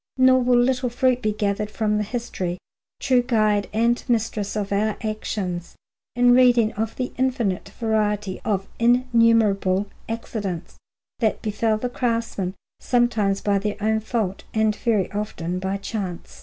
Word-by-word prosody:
Nor 260 0 +6
will 245 0 +3
little 250 +1 +2
fruit 250 +1 +1
be 215 -2 +1
gathered 210 0 -1
from 210 -1 0
the - - 0
history, 200 -6 -4 0.4
true 255 -2 +3
guide 215 -4 +1
and 235 +3 +1
mistress 220 -3 -1
of 205 -2 -2
our 210 +1 +1
actions, 200 -5 -3 0.4
in 245 0 +5
reading 245 -3 +5
of 220 +1 -3
the 255 -1 -3
infinite 245 -8 0
variety 210 -3 0
of 195 -3 -1
innumerable 230 -5 +3 0.2
accidents 205 -6 -4 0.4
that 220 -3 0
befell 215 +1 0
the 250 - -2
craftsmen, 230 -6 -2 0.2
sometimes 220 -5 +1
by 200 -1 +1
their 205 +1 -3
own 220 +1 +1
fault 215 -4 -2
and 220 -1 +2
very 215 -4 0
often 185 -4 -3
by 190 +1 -2
chance. 195 -3 -6
215 Hz, 140 wpm, -23 LUFS, 200-240 Hz, 0.4 s, Nor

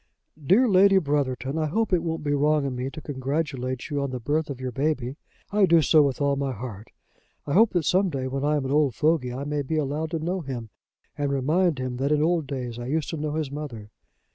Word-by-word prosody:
"DEAR 205 - +4
LADY 195 -1 +5
BROTHERTON, 140 -3 -1
I 155 - 0
hope 220 +6 0
it 175 - +3
won't 165 -2 -3
be 145 -1 0
wrong 150 0 +2
in 135 -2 -2
me 125 +2 -3
to 155 +3 -9
congratulate 135 -2 -3
you 145 -1 0
on 140 - -1
the 130 -1 -4
birth 150 +6 -1
of 135 -3 -5
your 130 -1 -4
baby. 135 -1 -1 0.4
I 205 -1 +4
do 165 -2 +5
so 155 +2 +5
with 140 -3 +1
all 140 -1 +2
my 140 -1 -2
heart. 110 -2 -8 0.6
I 140 - -2
hope 220 +4 +5
that 175 -4 +1
some 190 +1 +3
day, 135 -4 -3
when 135 +1 -3
I 150 +1 +2
am 145 -2 -1
an 130 - -2
old 145 -5 +2
fogy, 150 -5 +1
I 130 +3 -4
may 145 0 -2
be 150 +3 -2
allowed 150 +2 -1
to 165 - -2
know 180 +4 -2
him 125 -7 -6 0.4
and 145 -1 -1
remind 155 +5 +1
him 130 -1 -3
that 140 +3 0
in 150 0 +3
old 165 -3 +1
days 125 -4 -5
I 120 - -5
used 155 +2 -1
to 165 - -4
know 150 0 -3
his 155 -3 -2
mother. 125 -8 -7
145 Hz, 245 wpm, -25 LUFS, 130-160 Hz, 0.6 s, LADY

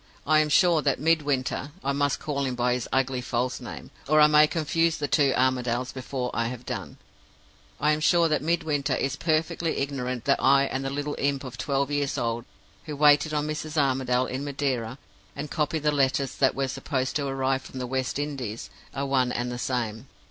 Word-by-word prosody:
I 155 +1 +4
am 155 0 +2
sure 170 +1 +4
that 140 -3 +1
Midwinter 145 -3 0
I 140 - 0
must 145 0 +1
call 140 -2 -2
him 130 -1 -2
by 125 0 +1
his 125 -1 -3
ugly 130 -1 +1
false 125 0 -2
name, - - -9 0.2
or 155 +2 +4
I 150 - +8
may 150 0 +6
confuse 165 +1 0
the 145 - -2
two 140 0 +3
Armadales 125 -1 0
before 130 -1 -4
I 115 0 0
have 125 0 -7
done - - -5 0.8
I 150 +1 +3
am 155 - +1
sure 170 +2 +4
that 155 -2 +1
Midwinter 150 -4 0
is 135 0 -1
perfectly 160 +2 0
ignorant 130 -3 -3
that 140 - +2
I 135 +1 +5
and 135 -1 -2
the 135 - -2
little 145 +1 -3
imp 140 -1 0
of 130 -3 -7
twelve 140 +2 -1
years 145 -1 -1
old 115 0 -2 0.4
who 150 -2 -5
waited 145 +1 +5
on 150 -1 0
Mrs. 155 +1 -4
Armadale 130 -3 +2
in 130 +2 -4
Madeira, 135 -4 -2 0.4
and 150 - -6
copied 150 0 -1
the 150 - +3
letters 135 -1 +1
that 135 -2 +3
were 135 0 0
supposed 130 0 -2
to 140 -1 -2
arrive 135 0 0
from 130 - -11
the 125 - -3
West 130 +1 -2
Indies, 135 -7 -4 0.2
are 140 +1 -1
one 130 -2 +1
and 120 0 -2
the 120 - -5
same. 120 -1 -3
140 Hz, 200 wpm, -26 LUFS, 130-150 Hz, 0.8 s, I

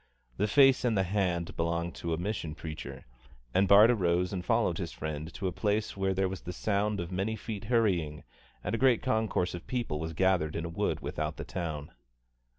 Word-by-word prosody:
The 105 - +1
face 135 +3 +5
and 115 -4 +2
the 95 - +3
hand 90 -3 -1
belonged 85 +1 -1
to 85 - -3
a 80 - 0
mission 90 -4 -3
preacher, 75 -5 -7 0.5
and 95 +1 +3
Bart 105 +4 +8
arose 90 -4 +1
and 90 -2 -3
followed 115 -5 +1
his 85 -3 -3
friend 80 +1 -5
to 100 - -5
a 95 - +1
place 105 +3 -1
where 95 -1 0
there 95 0 +2
was 95 -1 -5
the 90 - -6
sound 105 +2 0
of 85 +1 -4
many 95 +4 -1
feet 105 -2 -6
hurrying 95 -11 +1 0.4
and - - -2
a 115 - 0
great 130 -3 +4
concourse 110 -7 0
of 85 - -8
people 120 -12 -2
was 80 +1 -4
gathered 90 -3 +2
in 85 - -2
a - - -4
wood 85 - -1
without - - -3
the - - -6
town. 80 -5 -4
95 Hz, 205 wpm, -30 LUFS, 85-105 Hz, 0.5 s, Bart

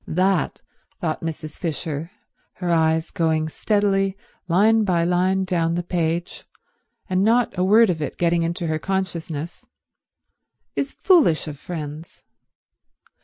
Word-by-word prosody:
That, 185 -1 0 0.4
thought 160 -3 -2
Mrs. 155 -2 -6
Fisher, 160 -1 -3 0.4
her 180 -1 -3
eyes 160 0 +2
going 160 -3 0
steadily 195 0 +1 0.3
line 215 +6 +4
by 175 -4 +1
line 185 +2 +2
down 170 -3 0
the 175 - -1
page 170 0 -2 0.6
and 185 -1 +1
not 230 +1 +2
a 180 - 0
word 210 +2 +5
of 160 -3 -4
it 150 - -4
getting 170 -1 +2
through - - +1
into 170 +1 -3
her 155 -1 -1
consciousness, 170 -4 -4 1.1
is 275 - -1
foolish 305 - +3
of 145 -2 -7
friends. 155 -1 -7
175 Hz, 130 wpm, -22 LUFS, 160-190 Hz, 1.1 s, word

